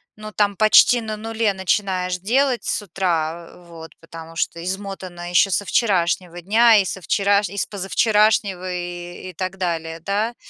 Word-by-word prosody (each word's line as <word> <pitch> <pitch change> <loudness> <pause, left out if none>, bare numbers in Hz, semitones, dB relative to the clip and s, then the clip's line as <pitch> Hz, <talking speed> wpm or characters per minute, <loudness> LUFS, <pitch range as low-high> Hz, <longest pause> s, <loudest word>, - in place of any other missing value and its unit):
ну, 215 0 -9
там 205 -1 +1
почти 215 +3 +5
на 215 -1 -5
нуле 225 -1 -1
начинаешь 185 -1 -1
делать 250 +6 +1
с - - -1
утра, 170 -3 -2
вот, 165 -1 -12
потому 165 0 -11
что 170 0 -2
измотанная 185 -2 -6
ещё 185 +2 +4
со 205 - 0
вчерашнего 175 -2 0
дня 220 +5 +5
и 200 - +2
со 190 +1 -5
вчераш 200 +1 +1
и 200 - -9
с - - 0
позавчерашнего 200 -2 +1
и 175 +1 -7
и - - -23
так 185 +2 -5
далее, 165 -3 -3
да. 205 +7 -2
190 Hz, 160 wpm, -21 LUFS, 175-210 Hz, -, почти